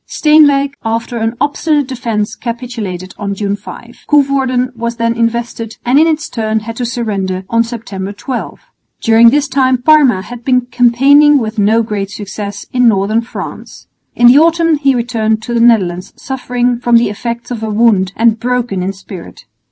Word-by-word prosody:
Steenwijk 290 Hz, -3 st, +3 dB
after 230 Hz, +1 st, -3 dB
an 225 Hz, +1 st, -2 dB
obstinate 290 Hz, 0 st, 0 dB
defence 230 Hz, -5 st, -3 dB
capitulated 230 Hz, -7 st, -6 dB
on 200 Hz, -1 st, -3 dB
June 200 Hz, 0 st, -2 dB
5. -, -, -12 dB
Coevorden 265 Hz, -3 st, +1 dB
was 235 Hz, 0 st, -4 dB
then 230 Hz, 0 st, 0 dB
invested 230 Hz, -1 st, -2 dB
and 255 Hz, +4 st, +3 dB
in 320 Hz, -, +4 dB
its 320 Hz, 0 st, -1 dB
turn 220 Hz, -2 st, -2 dB
had 225 Hz, +1 st, -7 dB
to 245 Hz, -, -2 dB
surrender, 200 Hz, -6 st, -3 dB
on 230 Hz, 0 st, +3 dB
September 205 Hz, -5 st, -6 dB
12. 245 Hz, +5 st, -6 dB, 0.4 s
During 230 Hz, +1 st, +6 dB
this 285 Hz, +3 st, +1 dB
time 260 Hz, -1 st, +1 dB
Parma 265 Hz, -8 st, +4 dB
had 240 Hz, +2 st, -10 dB
been 255 Hz, 0 st, +2 dB
campaigning 255 Hz, +4 st, +4 dB
with 220 Hz, -3 st, -3 dB
no 220 Hz, +3 st, +3 dB
great 205 Hz, -3 st, -4 dB
success 205 Hz, 0 st, -7 dB
in 250 Hz, -1 st, +3 dB
northern 215 Hz, +1 st, +2 dB
France. 230 Hz, -, -9 dB, 0.3 s
In 240 Hz, -, +2 dB
the 250 Hz, +4 st, +7 dB
autumn 330 Hz, 0 st, +3 dB
he 275 Hz, -2 st, +1 dB
returned 220 Hz, -2 st, -1 dB
to 240 Hz, -, -5 dB
the 235 Hz, -, +1 dB
Netherlands 190 Hz, -7 st, +2 dB
suffering 250 Hz, -2 st, -2 dB
from 240 Hz, -1 st, +3 dB
the 230 Hz, -3 st, +1 dB
effects 235 Hz, +3 st, -6 dB
of 235 Hz, -3 st, -4 dB
a 220 Hz, -, -3 dB
wound 210 Hz, -4 st, +2 dB
and 225 Hz, -1 st, +2 dB
broken 245 Hz, -5 st, -2 dB
in 190 Hz, +2 st, -2 dB
spirit. 190 Hz, -2 st, -11 dB
235 Hz, 170 wpm, -13 LUFS, 215-255 Hz, 0.4 s, the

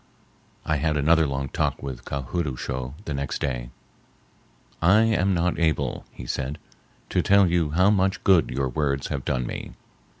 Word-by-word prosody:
I 75 Hz, -, +1 dB
had 75 Hz, +1 st, 0 dB
another 80 Hz, +2 st, +4 dB
long 70 Hz, 0 st, -3 dB
talk -, -, -1 dB
with 65 Hz, -3 st, -6 dB
Ka 70 Hz, -1 st, -3 dB
hood 85 Hz, +6 st, -2 dB
oo 65 Hz, -, -3 dB
shough 65 Hz, 0 st, -4 dB
the 75 Hz, -, -3 dB
next 70 Hz, 0 st, -2 dB
day. -, -, -3 dB, 1.1 s
"I 95 Hz, +6 st, +5 dB
am 100 Hz, -4 st, +2 dB
not 85 Hz, +1 st, 0 dB
able," 80 Hz, -2 st, 0 dB
he 60 Hz, -, -10 dB
said, 65 Hz, +4 st, -3 dB, 0.5 s
"to -, -, +2 dB
tell 100 Hz, 0 st, +5 dB
you 85 Hz, -3 st, +1 dB
how 90 Hz, +6 st, +4 dB
much 95 Hz, -1 st, +1 dB
good 95 Hz, -6 st, +4 dB
your 65 Hz, +1 st, -1 dB
words 70 Hz, 0 st, -1 dB
have 70 Hz, -3 st, -3 dB
done 65 Hz, -1 st, -1 dB
me. -, -, -6 dB
75 Hz, 175 wpm, -25 LUFS, 65-90 Hz, 1.1 s, I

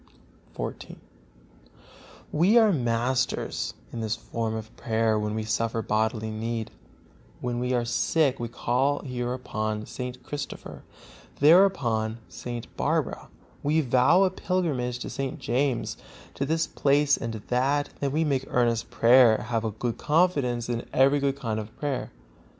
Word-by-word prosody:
XIV. -, -, -5 dB, 1.4 s
We 180 Hz, +9 st, +4 dB
are 220 Hz, -3 st, +6 dB
masters 125 Hz, -1 st, -1 dB, 0.2 s
in 115 Hz, -, -4 dB
this 110 Hz, 0 st, -1 dB
form 115 Hz, -1 st, -3 dB
of 110 Hz, 0 st, -7 dB
prayer 110 Hz, -1 st, +1 dB
when 105 Hz, 0 st, -2 dB
we 110 Hz, -, -2 dB
suffer 115 Hz, +1 st, -1 dB
bodily 110 Hz, +1 st, 0 dB
need; 115 Hz, +1 st, -3 dB, 0.7 s
when 120 Hz, -1 st, -2 dB
we 125 Hz, +1 st, -1 dB
are 120 Hz, -1 st, +1 dB
sick 135 Hz, +4 st, +1 dB
we 120 Hz, -, -2 dB
call 125 Hz, +4 st, 0 dB
here 125 Hz, -2 st, -3 dB
upon 110 Hz, -4 st, -3 dB
St. 125 Hz, 0 st, -6 dB
Christopher, 145 Hz, -1 st, -6 dB, 0.6 s
there 165 Hz, +7 st, +8 dB
upon 115 Hz, -, -1 dB
St. 120 Hz, -1 st, -6 dB
Barbara; -, -, -1 dB, 0.3 s
we 150 Hz, +3 st, +2 dB
vow 130 Hz, +8 st, +4 dB
a 190 Hz, -, +2 dB
pilgrimage 155 Hz, -11 st, -1 dB
to 125 Hz, -, -6 dB
St. 135 Hz, -1 st, -3 dB
James, 125 Hz, +1 st, -1 dB, 0.4 s
to 140 Hz, -, -2 dB
this 160 Hz, +2 st, +1 dB
place 145 Hz, +1 st, +3 dB
and 115 Hz, -, -4 dB
to 110 Hz, -, -5 dB
that; 140 Hz, +4 st, +1 dB
then 140 Hz, -1 st, -1 dB
we 155 Hz, +3 st, +1 dB
make 135 Hz, -4 st, 0 dB
earnest 120 Hz, -2 st, +1 dB
prayer, 120 Hz, -1 st, +6 dB
have 115 Hz, -2 st, 0 dB
a 110 Hz, -, 0 dB
good 115 Hz, +2 st, -4 dB
confidence 145 Hz, -7 st, +1 dB
and 120 Hz, -1 st, -2 dB
every 135 Hz, +2 st, +4 dB
good 140 Hz, -1 st, 0 dB
kind 115 Hz, -5 st, -2 dB
of 110 Hz, 0 st, -9 dB
prayer. 145 Hz, -3 st, -2 dB
125 Hz, 150 wpm, -26 LUFS, 115-140 Hz, 1.4 s, there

